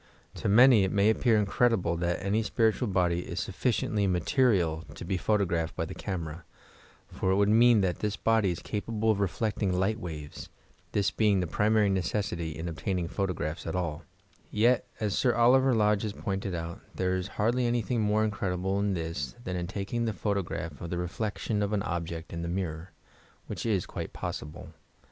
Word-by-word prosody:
To - - -2
many 120 0 +7
it 95 - 0
may 100 +1 +4
appear 115 0 +3
incredible 105 -3 +2
that 85 +2 -1
any 105 +3 +2
qiiritnal 110 0 +1
body 90 -2 +2
is 90 0 -5
soffieiently 105 0 0
material 90 - +2
to - - -8
be 95 - -1
fdiolofnphed 90 -4 0
by - - -1
the - - -7
earners, 85 -3 -3 0.7
for 95 - -2
it 95 - +4
would 100 +1 +3
mean 115 0 +6
that 90 -2 0
this 105 -1 -1
body 115 -3 +2
is 85 - -4
capable 110 +1 -1
of 105 - -1
lefleeting 100 +1 0
li^t 95 +4 +1
wsTes, 75 -7 -7 0.4
this 100 -1 +2
being 105 -3 +2
the 90 - 0
primaiy 105 +3 +2
necessity 95 -2 -1
in 80 +2 -4
obtaining 85 +1 -2
photogrsphs 90 -4 -3
at - - -3
alL 85 -5 -2 0.5
Tec 120 +4 +3 0.2
as 105 -2 -1
Sr 125 -2 +2
Oliver 125 +2 +5
Lodge 105 -2 +3
has 105 -2 -3
pointed 95 -2 -3
out, 85 0 -5 0.2
there 95 0 0
is 95 0 -2
hardly 120 +3 +2
anything 120 0 0
more 105 +1 +2
incredible 95 -2 -1
in 100 -1 0
this 80 - -4
than 90 - -3
in 90 -1 -3
taking 100 +5 -2
the 110 - -1
photograph 95 -6 -3
of 85 - -5
the 90 - -2
reflection 105 +4 -2
of 100 +1 -1
an 100 -2 0
object 85 -1 -4
in 85 - -4
the 85 - -3
nuiror, 85 -2 -3 0.6
whidi - - -4
is 100 -5 +1
quite - - -6
posa - - -4
ble. 80 +3 -10
100 Hz, 185 wpm, -29 LUFS, 85-110 Hz, 0.7 s, many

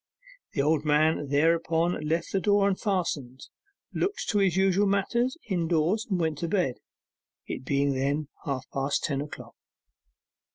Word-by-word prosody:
The 140 - +1
old 150 0 +2
man 150 0 +2
thereupon 165 +3 +1
left 165 +2 -1
the 195 - +1
door 205 0 +3
unfastened, 180 - -1 0.5
looked 400 +2 -2
to 205 - +2
his 190 -3 +2
usual 195 +1 +3
matters 235 +7 +1
indoors, 175 +2 +1
and 190 -3 0
went 160 -3 -1
to 170 - -2
bed, 175 -9 0 0.7
it - - -5
being 140 +1 +1
then 140 +3 -1 0.2
half 135 -3 -3
past 135 +1 0
ten 140 -3 -1
o'clock. 150 - -9
165 Hz, 140 wpm, -27 LUFS, 145-195 Hz, 0.7 s, door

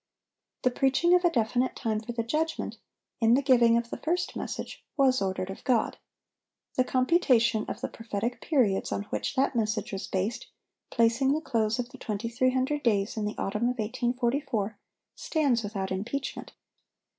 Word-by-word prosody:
The 255 - +3
preaching 270 +7 +3
of 360 0 +5
a 350 - +5
definite 245 -2 0
time 220 -3 -1
for 220 +2 -6
the 235 -1 -2
judgment, 315 +7 -2 0.4
in 230 0 +5
the 275 - +3
giving 235 -3 +5
of 235 0 -3
the - - -3
first 355 +3 -1
message, - - -5
was 260 -4 +4
ordered 190 -1 -2
of 190 - -10
God. 245 -4 +1 0.8
The 255 - +3
computation 255 -5 +3
of - - -5
the - - -1
prophetic 225 +1 -4
periods 240 -11 +1
on 200 - -1
which - - -2
that 270 0 +1
message 215 -1 -1
was 195 - -4
based, 195 +5 -2 0.4
placing 235 +4 +3
the 305 - +1
close 225 -7 0
of 245 -1 -3
the 265 - -12
2300 255 +6 0
days 205 -4 +1
in 215 -2 -2
the 210 - -4
autumn 210 +5 0
of 250 - -3
1844, 240 -1 -1 0.4
stands 280 -7 +1
without 200 -3 -4
impeachment. 240 +9 -4
235 Hz, 165 wpm, -28 LUFS, 215-265 Hz, 0.8 s, of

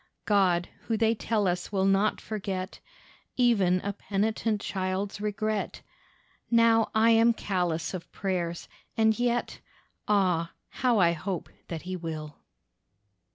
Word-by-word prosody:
God 185 -4 +3 0.2
who 225 - +1
they 225 0 +3
tell 220 -2 0
us 180 +1 -2
will 190 -2 +1
not 195 +2 +2
forget 195 -3 -4 0.6
Even 200 -8 +3
a 200 - -3
penitent 210 +2 -1
child's 190 +1 -3
regret! 210 0 -2 0.7
Now 230 -1 +4
I 225 +1 +5
am 230 +1 +5
callous 180 -7 -2
of 180 -2 -7
prayers, 175 -3 -3 0.3
and 220 0 +3
yet— 240 0 0 0.5
Ah, 180 -5 +2 0.2
how 245 -2 +1
I 175 -4 +5
hope 175 +2 -4 0.2
that 165 -2 -5
He 185 +1 -4
will. 155 -4 -6
200 Hz, 125 wpm, -28 LUFS, 180-220 Hz, 0.7 s, I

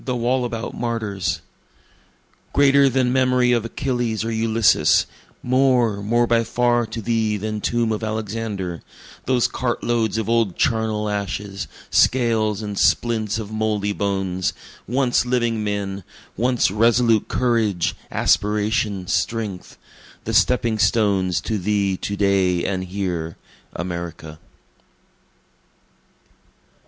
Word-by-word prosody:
The 125 -2 -2
Wallabout 120 -2 -1
Martyrs 105 -7 -2 1.1
Greater 140 0 +5
than 130 -1 +1
memory 125 -1 +3
of 120 -2 +2
Achilles 120 -3 -2
or 115 - -2
Ulysses, 110 -1 +3 0.4
More, 125 -5 +2
more 120 +4 +2
by 115 0 +2
far 120 0 +1
to 115 0 -6
thee 110 -2 0
than 105 +1 -4
tomb 120 0 0
of 110 +1 -3
Alexander, 110 -5 -4 0.5
Those 125 -2 +3
cart 120 -2 -3
loads 115 -3 0
of 110 - -2
old 115 -5 +1
charnel 110 -2 0
ashes, 100 -1 -4 0.2
scales 110 -4 +2
and 105 -1 -4
splints 110 -3 +1
of 110 -2 -6
mouldy 105 -2 -1
bones, 95 -3 -1 0.3
Once 125 +2 +2
living 120 -3 0
men 100 -2 -3 0.3
once 125 -1 +1
resolute 115 +1 +3
courage, 115 -8 0
aspiration, 105 -2 0
strength, 105 -1 -3 0.5
The 115 - -4
stepping 110 +1 +2
stones 100 -5 +2
to 110 -2 -2
thee 100 0 0
to 100 - -4
day 95 -3 +2
and 95 -2 -2
here, 90 -4 -4 0.4
America. 85 -3 -6
110 Hz, 115 wpm, -21 LUFS, 100-120 Hz, 1.1 s, Greater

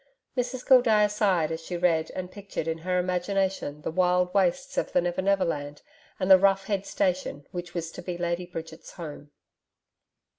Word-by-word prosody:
Mrs 250 0 -2
Gildea 230 -5 +6
sighed 190 -7 +1
as 160 0 -4
she 175 +2 -5
read, 165 -2 +2
and 185 0 -5
pictured 195 -5 -5
in 165 0 -2
her 180 +2 -1
imagination 180 -4 -1
the - - -2
wild 180 +1 +2
wastes 205 +9 +1
of - - -1
the - - +4
Never 175 +1 -1
Never 195 0 +2
Land 145 -2 -4 0.4
and 190 0 +1
the 190 - +10
rough 195 0 +3
head 200 -1 -2
station 185 -7 -1
which 175 -1 -6
was 165 -1 -3
to - - -8
be 180 -2 -5
Lady 175 0 -2
Bridget's 165 -2 -8
home. 150 -4 -8
180 Hz, 180 wpm, -27 LUFS, 165-195 Hz, 0.4 s, the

